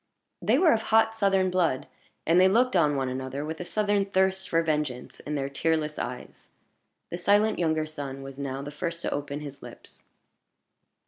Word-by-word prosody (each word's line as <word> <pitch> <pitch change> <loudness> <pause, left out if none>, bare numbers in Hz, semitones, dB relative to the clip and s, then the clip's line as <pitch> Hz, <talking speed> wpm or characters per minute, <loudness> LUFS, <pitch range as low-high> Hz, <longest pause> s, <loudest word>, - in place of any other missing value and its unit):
They - - +3
were 345 -4 +5
of 220 - +2
hot 225 0 +4
Southern 195 -3 +2
blood, 170 -8 +1 0.4
and 170 +3 +5
they 185 - +7
looked 235 +4 +3
on 150 -4 +3
one 135 -1 -1
another 130 +2 -4
with 160 +1 -5
a - - -3
Southern 205 +2 +1
thirst 190 -1 0
for 165 0 +2
vengeance 150 -6 -2
in 150 - -5
their 135 -1 -1
tearless 150 +2 -1
eyes. 125 0 -7 0.6
The 175 - -4
silent 205 +4 +3
younger 160 -2 +1
son 140 -3 -7
was 135 0 -9
now 135 -1 -4
the 145 - -6
first 170 +2 -4
to - - -1
open 145 0 -4
his 140 -2 -9
lips. - - -13
160 Hz, 185 wpm, -27 LUFS, 140-190 Hz, 0.6 s, they